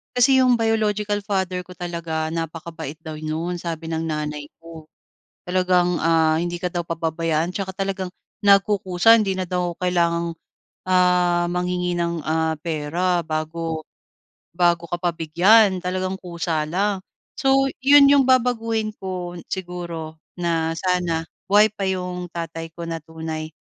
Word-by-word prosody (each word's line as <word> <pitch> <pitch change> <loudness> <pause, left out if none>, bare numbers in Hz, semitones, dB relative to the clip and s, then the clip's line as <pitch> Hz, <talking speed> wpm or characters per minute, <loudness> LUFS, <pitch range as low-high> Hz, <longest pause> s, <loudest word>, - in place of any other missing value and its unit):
Kasi 260 +2 +5
yung 255 -1 +5
biological 215 -2 0
father 190 -3 -1
ko 180 - -12
talaga, 170 -3 -3
napakabait 165 -2 -5
daw 160 -2 -6
no'n, 160 +3 -3
sabi 165 -1 -5
ng 160 0 -2
nanay 150 -1 -3
ko. 165 -2 -11 0.6
Talagang, 180 -1 +2
ah, 160 -1 +3
hindi 175 0 -2
ka 180 0 -3
daw 175 - 0
pababayaan 165 0 -1
tsaka 190 -1 -4
talagang, 190 -2 -3 0.4
nagkukusa 200 +1 +5
hindi 200 -4 +1
na 185 - -1
daw 180 -1 -1
kailangang, 170 -2 +1 0.5
ah, 180 -1 +3
manghingi 180 0 -1
ng, 170 -1 -1
ah, 160 0 +1
pera 170 +3 0
bago 160 0 -3 0.7
bago 170 -1 +2
ka 175 - -1
pa 175 -2 +1
bigyan, 185 +6 +4
talagang 185 +1 -2
kusa 170 -3 -2
lang. 195 +4 0 0.4
So, 270 -2 +3
'yon 280 +1 +7
yung 280 -2 +5
babaguhin 230 -4 +2
ko, 180 -2 -5
siguro 170 -4 -5 0.2
na 165 -2 0
sana 175 -2 0 0.3
buhay 210 +2 +6
pa 200 -2 -3
yung 180 -1 -3
tatay 165 -1 -5
ko 170 - -9
na 165 0 -3
tunay, 160 0 -6
175 Hz, 135 wpm, -22 LUFS, 165-190 Hz, 0.7 s, yon